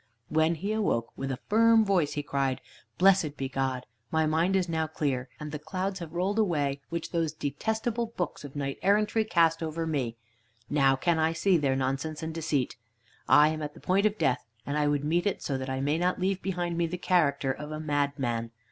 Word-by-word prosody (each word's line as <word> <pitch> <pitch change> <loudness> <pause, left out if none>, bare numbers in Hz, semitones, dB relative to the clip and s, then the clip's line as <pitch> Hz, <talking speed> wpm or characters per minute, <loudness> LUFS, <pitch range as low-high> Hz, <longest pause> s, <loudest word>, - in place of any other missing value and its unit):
When 160 +2 +2
he 195 +6 -3
awoke, 190 - 0
with 135 0 -3
a 130 - -3
firm 225 +1 +5
voice 180 -7 +2
he 145 - -3
cried: 135 -2 -1 0.4
"Blessed 180 -6 +4
be 135 - -2
God! 130 -1 -2 0.2
My 160 0 +2
mind 165 +5 +2
is 190 -2 +2
is - - -12
now 160 -1 0
clear, 140 -4 -2
and 150 -1 -6
the 150 - -4
clouds 185 +5 -3
have 170 -3 -7
rolled 190 +5 0
away 145 -9 +1
which 170 -1 -4
those 165 -3 0
detestable 220 - -2
books 185 -9 -4
of 145 -1 -9
knight 140 -1 -3
errantry 210 +3 +3
cast 165 -6 +2
over 165 0 -2
me. 130 -7 -2 0.5
Now 135 -2 +4
can 165 +4 +1
I 160 +1 +2
see 190 +3 +2
their 140 -5 +2
nonsense 135 +4 -2
and 160 0 -3
deceit. 150 -7 -1 0.5
I 150 +1 +7
am 155 0 -3
at 150 0 -5
the - - -12
point 195 +3 +2
of 210 0 -3
death, 130 -9 +1 0.2
and 140 - -2
I 150 -1 +2
would 145 -1 +1
meet 170 +6 +1
it 200 - -2
so 140 - -1
that 130 0 -4
I 130 0 -2
may 145 +4 +1
not 180 +2 +1
leave 190 +1 0
behind 175 -2 -2
me 170 - +2
the 180 +2 -4
character 145 -7 +2
of 150 +3 -6
a 155 - -4
madman. 140 -6 -1
155 Hz, 215 wpm, -28 LUFS, 140-180 Hz, 0.5 s, I